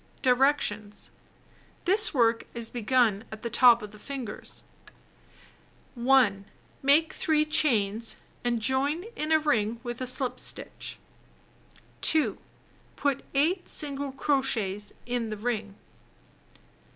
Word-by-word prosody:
Directions: 250 -6 +1 0.7
This 410 +4 +6
work 230 -4 +2
is 230 -1 -1
begun 235 -3 +1
at 215 0 -9
the 235 - -4
top 240 -1 +6
of 210 - -8
the 215 - -14
fingers. 255 -4 -7 1.3
1. 240 -6 +3 0.4
Make 295 +4 +3
3 305 -1 +1
chain 225 -9 +1
stitches, 230 - -1 0.2
and 240 -1 0
join 270 +8 0
in 305 +1 -3
a 315 - +6
ring 235 -7 0
with 240 0 -6
a 255 - -2
slip 255 0 0
stitch. - - -5 1.0
2. 315 -1 +2 0.6
Put 280 -1 -1
8 335 +7 +1
single 285 -2 -1
crochets 260 -8 0
in 245 -2 -2
the 215 - -5
ring. 215 -2 -3
245 Hz, 115 wpm, -27 LUFS, 220-285 Hz, 1.3 s, This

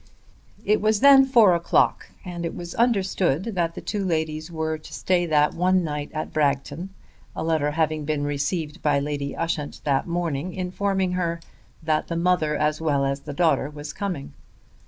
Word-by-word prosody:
It 210 - +2
was 215 0 +2
then 275 -1 +8
four 230 -8 +5
o'clock, 170 0 +1 0.2
and 175 -1 -5
it 170 - -3
was 175 -1 -7
understood 195 - +1
that 170 -3 -1
the - - -6
two 205 -2 -3
ladies 160 -3 -2
were 160 -1 -2
to 155 - -13
stay 175 -2 +1
that 150 -2 +3
one 185 +1 +2
night 150 -2 -4
at 155 0 -5
Bragton, 145 +4 -1 0.5
a - - -3
letter 160 -3 +1
having 155 0 0
been 145 -1 -1
received 150 +2 -2
by 145 -2 +2
Lady 140 0 -3
Ushant 160 -3 -3
that 140 0 +1
morning 170 -1 -2
informing 190 0 -1
her 170 -2 -1 0.4
that 155 -1 0
the 170 - -3
mother 170 -3 +1
as 150 +1 0
well 145 -3 +1
as 135 +1 -1
the 145 +1 -8
daughter 160 -3 +2
was 150 0 -8
coming. 180 -9 -4
165 Hz, 175 wpm, -24 LUFS, 150-180 Hz, 0.5 s, then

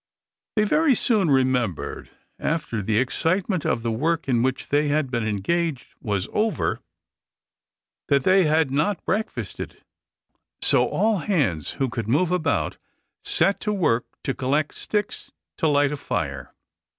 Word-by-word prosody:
They 215 - +3
very 300 +5 +3
soon 210 -7 +2
remembered, 130 - 0 0.3
after 150 -9 -1
the 105 +2 0
excitement 175 - 0
of 115 - 0
the 115 - 0
work 160 +8 0
in 120 -3 +2
which 130 +1 -1
they 145 +1 +2
had 145 -2 0
been 120 -2 0
engaged 140 - -1
was 100 -3 -1
over, 220 +1 0 1.3
that 140 -2 +3
they 185 +2 +5
had 155 -2 +2
not 155 +8 0
breakfasted; 220 +4 -3 0.8
so - - +3
all 215 -2 +1
hands 140 - 0
who 135 - -1
could 115 -3 -4
move 155 +9 +2
about 160 -5 0 0.5
set 200 - +2
to 210 - -1
work 140 - +1 0.2
to 135 - -1
collect 140 +4 0
sticks 210 -1 -3 0.3
to 160 - +2
light 145 -1 +3
a 150 - -3
fire. 70 - -3
145 Hz, 140 wpm, -24 LUFS, 125-180 Hz, 1.3 s, they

